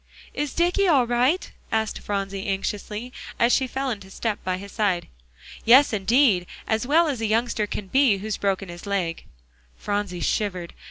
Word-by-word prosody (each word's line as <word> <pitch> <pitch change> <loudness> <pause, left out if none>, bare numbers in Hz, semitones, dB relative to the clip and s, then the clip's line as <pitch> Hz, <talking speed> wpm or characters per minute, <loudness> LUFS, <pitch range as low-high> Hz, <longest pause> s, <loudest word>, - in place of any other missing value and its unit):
"Is 290 -1 -3
Dicky 355 +3 +2
all 280 -8 +4
right?" 250 +9 +1 0.2
asked 220 -1 -1
Phronsie 195 -1 -3
anxiously, 210 +4 -3 0.2
as 235 +1 +3
she 265 - +2
fell 265 +1 -2
into 200 -4 -7
step 210 +2 -3
by 185 0 -1
his 200 +1 -9
side. 195 -5 0 0.6
"Yes, 255 +3 +6
indeed; 210 -3 +3 0.2
as 225 +2 -1
well 325 +4 +4
as 265 -6 -2
a 225 - 0
youngster 220 -1 0
can 205 - -5
be, 255 0 +3
who's 215 +2 -3
broken 195 -1 -1
his 175 +3 -9
leg." 180 -5 -2 0.5
Phronsie 205 -3 -2
shivered. 180 -3 -1
215 Hz, 165 wpm, -24 LUFS, 195-250 Hz, 0.6 s, Yes